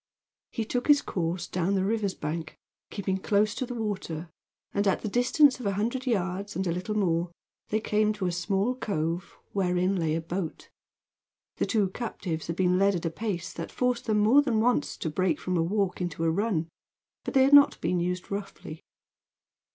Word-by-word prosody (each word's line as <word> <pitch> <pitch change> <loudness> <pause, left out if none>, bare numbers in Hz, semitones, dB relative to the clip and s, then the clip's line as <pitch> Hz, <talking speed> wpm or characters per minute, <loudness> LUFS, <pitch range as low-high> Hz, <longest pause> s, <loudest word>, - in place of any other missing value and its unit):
He 225 - -3
took 245 +3 -2
his 290 -1 +7
course 175 0 -2
down 185 +2 -1
the 190 -1 +1
river's 205 -2 0
bank, 155 +1 -5 0.3
keeping 190 -2 -2
close 205 +2 +2
to 255 +2 -3
the 245 - -5
water, 185 -7 -4 0.4
and 200 0 +1
at 195 - +2
the - - -1
distance 255 +5 +4
of 235 - -3
a 200 - +1
hundred 240 +6 -2
yards 200 -2 -1
and 190 - -1
a 175 - 0
little 185 +5 -2
more 175 -3 +1 0.4
they 215 - +1
came 215 0 +1
to 200 -3 -4
a 180 - +1
small 195 +6 0
cove 175 -7 -3
wherein 185 0 +1
lay 160 -2 0
a 165 - -1
boat. 170 0 -5 0.9
The - - 0
two 210 -5 +2
captives 185 -7 -4
had 170 - -2
been 180 0 +2
led 200 0 +4
at 175 - -3
a 165 - 0
pace 190 -3 -4
that 165 - -6
forced 250 -1 0
them 215 -1 +2
more 220 +7 +6
than 245 -7 +1
once 245 +3 +1
to 160 - -3
break 175 -1 +1
from 185 - -2
a 170 - +2
walk 190 +2 0
into 165 -2 -3
a 165 - +3
run, 185 -3 0 0.6
but - - -5
they 265 - +7
had 275 +2 +3
not 285 0 +7
been 175 +2 0
used 180 +2 -3
roughly. 195 -5 -6
195 Hz, 200 wpm, -28 LUFS, 175-215 Hz, 0.9 s, his